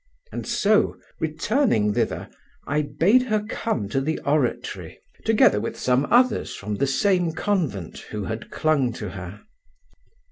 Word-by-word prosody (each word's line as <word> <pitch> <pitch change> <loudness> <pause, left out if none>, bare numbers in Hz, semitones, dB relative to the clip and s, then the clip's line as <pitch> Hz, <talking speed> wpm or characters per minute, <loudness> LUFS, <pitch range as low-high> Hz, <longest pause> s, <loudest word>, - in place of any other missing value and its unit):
And - - -5
so, 210 +1 +2 0.2
returning 160 - +1
thither, - - -1 0.4
I 150 +1 +1
bade 190 - +3
her 215 -4 0
come 130 - -2
to 135 +5 0
the 155 +4 -1
oratory, 140 -4 -1 0.3
together 215 - +4
with 115 - -4
some 130 +2 +1
others 245 -1 +3
from 105 +1 -5
the 140 - +1
same 180 +3 +2
convent 160 - -2
who 105 -1 -4
had 110 +3 -5
clung 140 -6 +1
to 105 -4 -5
her. 95 +1 -8
150 Hz, 140 wpm, -24 LUFS, -, 0.4 s, together